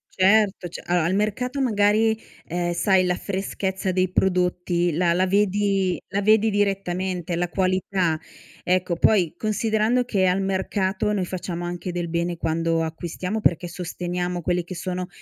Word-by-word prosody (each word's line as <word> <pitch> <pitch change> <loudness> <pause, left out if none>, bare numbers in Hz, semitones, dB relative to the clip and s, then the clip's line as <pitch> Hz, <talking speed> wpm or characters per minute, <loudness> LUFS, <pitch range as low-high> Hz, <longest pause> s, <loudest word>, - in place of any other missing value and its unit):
Certo, 195 -1 +3
c 170 - -8
allora, 175 -2 +1
al 180 - +1
mercato 250 +6 -1
magari, 220 -2 +3 0.3
ehm, 175 +1 -2
sai 185 +2 +3
la 180 0 +1
freschezza 190 0 -3
dei 185 0 +1
prodotti 180 -2 +1
la 170 +2 +2
la 185 +2 +2
vedi 195 -1 +1
la 200 +1 -1
vedi 215 +1 +4
direttamente, 185 -3 -1
la 175 0 -1
qualità, 185 -3 0 0.4
ecco. 180 -1 +1
Poi, 180 -4 +3
considerando 220 +3 +1
che 195 -6 +1
al 180 +1 +2
mercato 190 +1 -1
noi 190 -3 0
facciamo 175 -1 -4
anche 175 +1 -4
del 175 -1 -3
bene 170 +1 -1
quando 165 0 0
acquistiamo, 175 +6 -4
perché 175 -1 +1
sosteniamo 175 0 -4
quelli 175 +1 0
che 180 +2 -8
sono 180 +1 -4
185 Hz, 150 wpm, -23 LUFS, 175-200 Hz, 0.4 s, vedi